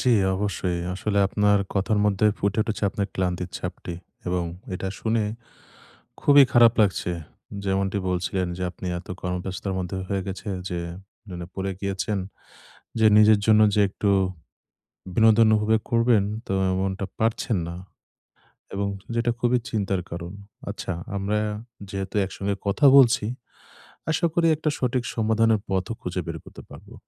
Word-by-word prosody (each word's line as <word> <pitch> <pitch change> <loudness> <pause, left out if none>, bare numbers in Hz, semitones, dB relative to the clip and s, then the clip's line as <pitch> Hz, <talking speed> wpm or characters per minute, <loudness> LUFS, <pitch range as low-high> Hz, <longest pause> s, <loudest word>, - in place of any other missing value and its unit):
জ্বি, 125 -3 +4 0.2
অবশ্যই। 95 -3 -1 0.2
আসলে 100 +2 -1
আপনার 105 +1 +3 0.2
কথার 105 +2 +1
মধ্যে 105 0 +3
ফুটে 100 +2 0
উঠেছে 110 -1 -4
আপনার 100 0 -2
ক্লান্তির 90 -1 -2
ছাপটি। 90 -1 -6 0.3
এবং 90 -1 0 0.3
এটা 95 +1 -3
শুনে 110 -1 +1 1.0
খুবই 145 -1 +7
খারাপ 120 -1 +7
লাগছে। 95 -3 +1 0.5
যেমনটি 95 +1 0
বলছিলেন 90 +1 -1
যে 95 - -5
আপনি 95 - -9
এত - - -13
কর্মব্যস্তর 90 +2 -3
মধ্যে 90 +1 -3
হয়ে 100 -1 -1
গেছে 95 +2 -6 0.2
যে, 90 -1 -3 0.5
ন - - -10
মানে 85 -1 -6
পড়ে 95 0 -2
গিয়েছেন 100 +1 -2 0.8
যে, 110 - +5
নিজের 105 0 +7
জন্য 110 -1 +6
যে 105 - +3
একটু 100 +1 -1 1.0
বিনোদন 110 +1 +6
উপভোগ 110 +1 +2
করবেন, 115 -2 +4 0.2
তো - - -3 0.2
এমনটা 95 +1 -1
পারছেন 110 -1 0
না। 85 - -6 1.0
এবং 100 0 -1 0.3
যেটা 115 +1 +1
খুবই 125 +1 +3
চিন্তার 100 -3 0
কারণ। 85 +1 -6 0.4
আচ্ছা। - - -4 0.2
আমরা 100 +2 0 0.5
যেহেতু 95 -1 -5
একসঙ্গে 100 +1 -3
কথা 100 +9 +3
বলছি, 120 -6 +6 0.9
আশা 160 +2 +2
করি 170 -1 +3
একটা 155 +1 -2
সঠিক 125 -1 0
সমাধানের 110 -1 +2
পথও 95 +3 -1
খুঁজে 90 0 -3
বের 85 -1 -4
করতে - - -12
পারবো। - - -13
100 Hz, 140 wpm, -25 LUFS, 95-110 Hz, 1.0 s, খুবই